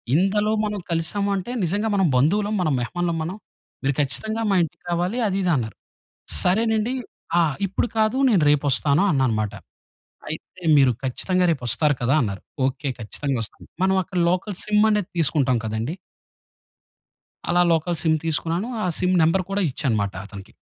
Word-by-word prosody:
ఇందులో 205 +5 +2
మనం 210 -1 -3
కలిసాము 170 +5 0
అంటే 195 +5 -4
నిజంగా 205 +6 0
మనం 190 -3 +3
బంధువులం 205 +11 +2
మనం 155 -5 +1
మెహమానులం 170 +7 -2
మనం. 175 +5 -4 0.5
మీరు 135 +1 +1
ఖచ్చితంగా 215 - 0
మా - - +3
ఇంటికి 160 - -7
రావాలి 180 +7 -1
అది 195 - -1
ఇది 180 - +2
అన్నారు." 110 -3 -4 0.7
సరేనండి 220 +5 +1 0.5
ఆ! - - +5 0.3
ఇప్పుడు 195 +5 -1
కాదు. 220 +3 +2
నేను 195 -9 +3
రేపొస్తాను 145 +3 +2
అన్నాను 130 -5 +1
మాట. 105 -2 -3 0.8
అయితే 160 +3 -8 0.2
మీరు 135 -2 +5
ఖచ్చితంగా 180 +8 0
రేపు 140 -6 -3
ఒస్తారు 150 +3 +2
కదా! 125 +4 +2
అన్నారు. 100 -5 -3 0.3
ఓకే. 135 +2 -3
ఖచ్చితంగా 135 +5 -3
ఒస్తాను. 105 - -9 0.2
మనం 190 0 +3
అక్కడ 185 0 -3
లోకల్ 185 +3 -1
సిమ్ 210 0 +3
అనేది 210 -3 0
తీసుకుంటాం 140 -5 +2
కదండీ! 110 +9 -3 1.6
అలా 175 0 +4
లోకల్ 165 +1 0
సిమ్ 160 -1 +3
తీసుకున్నాను. 165 +6 -1 0.2
ఆ - - 0
సిమ్ 185 0 +2
నంబర్ 165 +4 +2
కూడా 200 +1 0
ఇచ్చా 140 - -4
అన్నమాట 100 -3 -1
అతనికి. 100 -2 -12
170 Hz, 155 wpm, -23 LUFS, 135-195 Hz, 1.6 s, ఆ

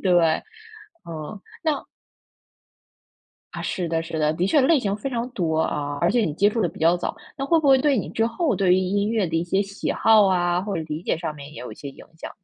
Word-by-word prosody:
对 185 -2 +3
吧？ 165 -2 +4 0.7
嗯， 160 +6 -7 0.2
那 305 -4 0 1.7
啊， - - -5
是 180 -5 -2
的 165 0 0
是 160 -1 -5
的， 150 0 +2
的 180 +3 0
确 290 - +4
类 280 +3 +4
型 200 -5 -1
非 245 +6 -4
常 240 -1 -3
多 165 -8 -1
啊， 145 -2 -2
而 170 - +3
且 245 - +2
你 155 - -1
接 205 +5 +4
触 230 - -2
得 175 - +2
比 - - -12
较 165 +2 +4
早， 175 - -4 0.2
那 275 - -3
会 330 +1 +4
不 290 - +1
会 265 -1 +7
对 280 -1 +2
你 205 - -2
之 225 0 +1
后 255 +3 0
对 185 -1 +3
于 - - +3
音 200 +3 0
乐 220 -5 +1
的 165 0 -2
一 165 - 0
些 190 +3 +1
喜 200 0 -4
好 220 -3 +5
啊， 175 -1 +1
或 200 +1 -3
者 160 - -2
理 155 +2 -4
解 - - 0
上 160 -2 -4
面 145 0 -11
也 150 - -9
有 125 -3 -7
一 - - -9
些 140 - -8
影 135 - -12
响。 - - -7
185 Hz, 270 characters per minute, -23 LUFS, 165-225 Hz, 1.7 s, 会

